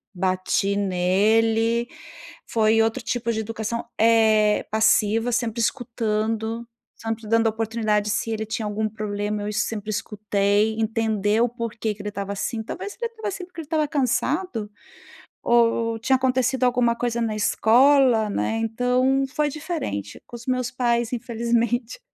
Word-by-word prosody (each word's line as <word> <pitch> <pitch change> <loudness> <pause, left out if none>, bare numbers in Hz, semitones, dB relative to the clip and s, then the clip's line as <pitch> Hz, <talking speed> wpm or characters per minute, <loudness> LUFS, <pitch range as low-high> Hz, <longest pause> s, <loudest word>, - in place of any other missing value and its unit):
bati 185 +2 0
nele, 220 +5 +2 0.6
foi 225 0 +3
outro 225 +3 0
tipo 235 -1 -1
de 220 - -1
educação, 225 +1 -4
eh, 220 -2 +4
passiva, 220 +2 +3
sempre 235 -1 -1
escutando, 225 -1 -2 0.3
sempre 225 0 -5
dando 230 +1 +3
oportunidade. 220 -1 0
Se 225 +2 -1
ele 220 0 -2
tinha 220 0 -3
algum 210 +1 -1
problema, 210 0 -3
eu 210 - -3
es 210 -1 0
sempre 215 -1 -5
escutei, 210 0 0
entender 220 -1 +1
o 240 - +3
por 235 -1 -5
que 220 -2 -2
que 205 - -10
ele 210 - -4
estava 200 -1 -5
assim. 220 +3 -3
Talvez 400 - -6
ele 470 -1 -2
estava 440 -2 -6
assim 370 -2 -6
porque 350 -2 -9
ele - - -10
estava 305 -1 +1
cansado, 260 - -1 0.8
ou 230 -1 +3
tinha 265 +4 +2
acontecido 260 0 +1
alguma 245 -1 +3
coisa 235 0 -2
na 225 -2 -1
escola, 235 +1 +4
né. 220 +2 -1
Então, 250 +4 +1
foi 300 -1 +1
diferente 285 - -5
com - - -10
os 235 - -13
meus 255 -1 -1
pais 240 -1 0
infelizmente 235 - -1
225 Hz, 150 wpm, -23 LUFS, 215-245 Hz, 0.8 s, eh